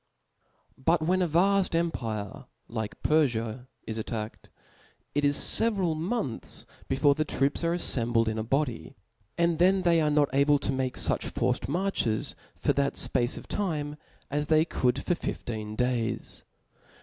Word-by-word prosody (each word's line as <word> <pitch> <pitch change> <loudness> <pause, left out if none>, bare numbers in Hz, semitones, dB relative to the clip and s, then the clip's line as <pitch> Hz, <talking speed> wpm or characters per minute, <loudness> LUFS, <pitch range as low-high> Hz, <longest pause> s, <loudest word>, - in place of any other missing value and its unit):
But 165 +1 +3
when 185 +3 +2
a 180 - +2
vaft 185 +3 +2
empire, 115 -12 -2 0.2
like 110 -2 -5
Perfiai 125 -5 +1 0.2
is 110 0 -3
attacked, 110 0 -5 0.6
it 145 - 0
is 145 0 +4
fcveral 195 -8 +2
months 165 - -3 0.2
before 140 +2 +3
the 155 - 0
troops 140 +1 -1
are 170 +1 +1
aflembled 120 -8 +2
in 110 0 -1
a - - -1
body; 135 +1 -2 0.4
and 170 -1 +2
then 185 +2 +4
they 170 -2 +4
are 150 - +2
not 145 -3 +2
able 140 +1 +4
to 140 - -2
make 130 -1 -1
fuch - - +1
forced - - -1
marches 165 - 0 0.2
for - - +1
that 140 0 +1
fpace 120 -1 +1
of - - -9
time, 150 -7 -2 0.4
as 145 +1 -1
they 155 0 +4
could 125 -6 0
for - - +1
fifteen 110 -10 -4
days. 125 -1 -2
145 Hz, 150 wpm, -28 LUFS, 120-170 Hz, 0.6 s, is